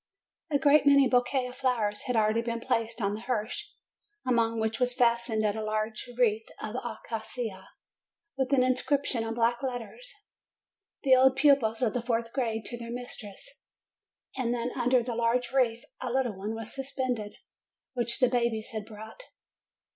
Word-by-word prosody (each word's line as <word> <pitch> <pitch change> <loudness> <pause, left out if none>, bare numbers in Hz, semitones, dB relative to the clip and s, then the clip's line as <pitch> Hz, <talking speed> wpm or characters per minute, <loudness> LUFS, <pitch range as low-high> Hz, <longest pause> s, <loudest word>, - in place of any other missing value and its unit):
A 290 - +3
great 285 +1 +4
many 280 -1 +7
bouquets 250 +1 +2
of 250 +1 -10
flowers 230 -6 0
had 250 - 0
already 220 +1 +3
been 235 0 -3
placed 230 0 -1
on 200 0 +1
the 210 - -4
hearse, 250 - -3 0.5
upon 230 -2 +2
which 220 0 -1
was 250 -1 +1
fastened 235 -3 +2
a 215 +1 0
large 215 +2 -2
wreath 225 -3 +2
of 215 - -5
acacia, 220 -3 -5 0.7
with 265 0 -1
an 265 -2 +5
inscription 255 -1 +1
in 225 0 -3
black 235 0 +1
letters: 265 - -5 0.9
The 265 -2 +6
old 260 0 +5
pupils 270 -5 +3
of 220 -3 +2
the 245 - -1
fourth 230 -1 -1
grade 225 -5 -1
to 240 - -5
their 235 0 -7
mistress. 245 - -7 0.7
And 245 -2 0 0.2
under 250 -1 +3
the 240 0 -3
large 235 +1 +1
wreath 245 -3 +1 0.2
a 255 - -3
little 250 -2 0
one 205 +4 -4
was 225 -1 -6
suspended, 255 -6 -3 0.6
which 240 -2 0
the 255 - +5
babies 235 -3 0
had 215 -2 -5
brought. 220 - -10
235 Hz, 160 wpm, -29 LUFS, 225-255 Hz, 0.9 s, many